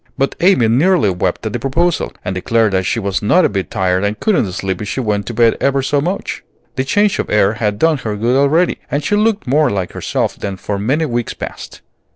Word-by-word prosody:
But 135 - 0
Amy 175 -10 +4
nearly 130 - +3
wept 90 +4 -2
at 110 - -3
the 120 - -2
proposal, 165 +8 0
and 95 - -2
declared 110 +3 +1
that 95 -1 0
she 115 - 0
was 100 -2 -2
not 175 - +3
a - - +2
bit 100 -2 -3
tired 95 -2 0
and 105 +1 -1
couldn't 180 - +1
sleep 95 0 -3
if 105 - -4
she 130 - -3
went 105 -4 -1
to 120 - -4
bed 115 0 +4
ever 140 -1 +1
so 140 +1 +1
much. 180 +6 -3 0.3
The 130 - 0
change 205 +7 +1
of - - -2
air 105 -1 +3
had 105 -2 -1
done 160 +1 +2
her 110 -4 -3
good 115 +4 0
already, 145 +6 +2
and 145 +1 -1
she 205 - +1
looked 215 0 +1
more 145 +4 +2
like 95 -3 -2
herself - - -2
than 100 -1 -5
for 100 +1 -4
many 140 +10 0
weeks 120 -4 -3
past. - - -8
115 Hz, 230 wpm, -16 LUFS, 100-150 Hz, 0.3 s, Amy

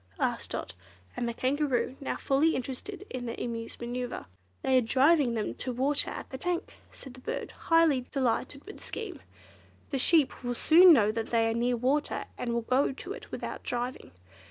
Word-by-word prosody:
asked - - -1
Dot - - -4 0.4
and 240 - -1
the - - -3
Kangaroo, 265 -1 0
now 275 - -2
fully 285 +4 +2
interested 270 +11 -5
in 245 -1 -4
the 230 - -5
Emu's 230 -1 -5
manoeuvre. 245 +1 -4 0.4
"They 260 -1 +4
are - - +1
driving 265 +2 +3
them 215 -2 -2
to 255 - -4
water 270 +4 +1
at - - -6
the 265 - -6
tank," 355 +3 -2 0.2
said 265 - -11
the 255 - -13
bird, - - -4
highly 325 -7 +2
delighted 270 +1 -1
with 415 - -10
the - - -13
scheme. 440 -5 -6 0.7
"The 270 - 0
sheep 300 -2 +3
will 245 0 -2
soon 345 +7 +8
know 215 -9 +5
that 225 0 -3
they 230 -1 +2
are - - -1
near 240 +1 +1
water, 270 +5 0
and 240 - -3
will 235 0 0
go 255 +5 +2
to 360 +8 -7
it - - -11
without - - -5
driving. 245 +1 -4
260 Hz, 190 wpm, -29 LUFS, 240-295 Hz, 0.7 s, soon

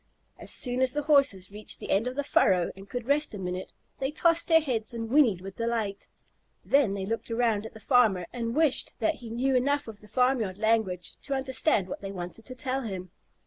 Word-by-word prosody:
As - - -7
soon 250 0 +2
as 260 -1 +3
the 295 0 -1
Horses 275 -11 +3
reached 210 +1 -5
the - - -5
end 210 +5 +2
of 250 - -4
the 285 - -1
furrow 185 -10 +3
and 195 +1 -13
could 245 +1 -4
rest 285 -2 +1
a - - -5
minute, 185 0 -5 0.3
they 265 - -1
tossed 335 +2 +2
their 325 -1 +6
heads 240 -7 -2
and 225 0 -5
whinnied 245 -11 +4
with 195 0 -9
delight. 225 -4 -2 0.6
Then 270 -8 +3
they 195 -1 -3
looked 225 +3 -3
around 225 -2 0
at - - -16
the - - -10
farmer, 220 -8 +3
and 235 -1 -3
wished 310 -4 +2
that 320 - +2
he 235 - -8
knew 255 +4 0
enough 285 +2 +1
of 215 -2 -9
the 210 - -16
farmyard 230 -4 +1
language 215 -5 0
to 280 - -3
understand 260 - +1
what - - -6
they 195 -1 -5
wanted 180 +4 -7
to 255 - -5
tell 260 +1 -1
him. 185 -6 -6
230 Hz, 220 wpm, -28 LUFS, 200-265 Hz, 0.6 s, their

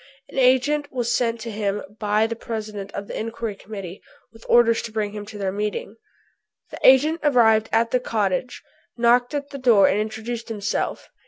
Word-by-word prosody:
An - - -3
agent 275 +3 +2
was 240 -2 -1
sent 230 -2 0
to 230 +1 -5
him 205 -1 -2 0.2
by 210 0 +2
the 230 +1 -3
President 215 -3 -6
of 200 - -5
the - - -8
Inquiry 230 0 -4
Committee 195 -3 -9 0.3
with 225 - -16
orders 235 -1 +5
to 230 - -7
bring 215 -2 -2
him 205 0 -7
to 215 -1 -9
their 195 -2 -2
meeting. 210 +1 -4 0.8
The - - -8
agent 300 +5 +5
arrived 225 -6 +4
at 230 +1 +2
the 250 - +2
cottage, 220 0 -2 0.3
knocked 245 +3 +3
at 285 0 -4
the 280 - -7
door 230 -6 +5
and 200 - +1
introduced 220 +2 -4
himself. 210 -2 -3
225 Hz, 180 wpm, -23 LUFS, 210-245 Hz, 0.8 s, orders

